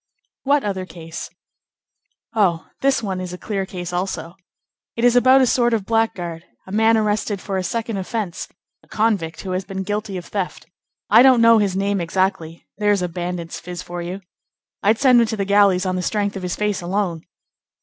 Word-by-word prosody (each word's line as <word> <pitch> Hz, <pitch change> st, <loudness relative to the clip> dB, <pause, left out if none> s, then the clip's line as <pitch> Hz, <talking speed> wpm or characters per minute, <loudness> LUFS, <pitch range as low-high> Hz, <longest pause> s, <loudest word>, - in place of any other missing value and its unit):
"What 285 Hz, +1 st, +2 dB
other 190 Hz, -2 st, -3 dB
case?" 165 Hz, -1 st, -8 dB, 1.0 s
"Oh! 185 Hz, -7 st, +2 dB, 0.2 s
this 270 Hz, -3 st, +2 dB
one 190 Hz, -3 st, -3 dB
is 180 Hz, -1 st, -6 dB
a -, -, -6 dB
clear 195 Hz, -1 st, -3 dB
case 180 Hz, -2 st, -6 dB
also. 175 Hz, -2 st, -3 dB, 0.6 s
It 230 Hz, -, -3 dB
is 245 Hz, 0 st, +5 dB
about 260 Hz, +2 st, +6 dB
a -, -, +5 dB
sort 240 Hz, -1 st, +2 dB
of 210 Hz, -4 st, -3 dB
blackguard; 180 Hz, -7 st, -1 dB, 0.2 s
a 190 Hz, -, -11 dB
man 220 Hz, +2 st, +4 dB
arrested 210 Hz, -1 st, 0 dB
for 195 Hz, +1 st, -4 dB
a 190 Hz, -, -1 dB
second 225 Hz, +2 st, -3 dB
offence; 195 Hz, -1 st, -4 dB, 0.3 s
a -, -, -26 dB
convict 200 Hz, -7 st, 0 dB
who 190 Hz, -, -5 dB
has 185 Hz, +1 st, -1 dB
been 190 Hz, 0 st, -5 dB
guilty 205 Hz, 0 st, -3 dB
of 175 Hz, -, -7 dB
theft. 195 Hz, -3 st, -4 dB, 0.5 s
I 225 Hz, +3 st, +8 dB
don't 260 Hz, -2 st, +6 dB
know 230 Hz, -1 st, +6 dB
his 200 Hz, -3 st, 0 dB
name 200 Hz, -1 st, 0 dB
exactly. 170 Hz, -1 st, -1 dB
There's 205 Hz, -3 st, +2 dB
a -, -, 0 dB
bandit's 175 Hz, 0 st, -5 dB
phiz 175 Hz, 0 st, -7 dB
for 175 Hz, -1 st, -6 dB
you! 180 Hz, +3 st, -5 dB, 0.6 s
I'd 215 Hz, +2 st, +3 dB
send 250 Hz, -2 st, +5 dB
him 230 Hz, -, +2 dB
to 220 Hz, 0 st, -3 dB
the 200 Hz, -, -1 dB
galleys 200 Hz, -2 st, +4 dB
on 185 Hz, 0 st, -1 dB
the -, -, -1 dB
strength 205 Hz, +2 st, -1 dB
of 195 Hz, -, -5 dB
his 180 Hz, -1 st, -3 dB
face 210 Hz, -2 st, -1 dB
alone." 175 Hz, -2 st, -2 dB
195 Hz, 195 wpm, -21 LUFS, 180-220 Hz, 1.0 s, I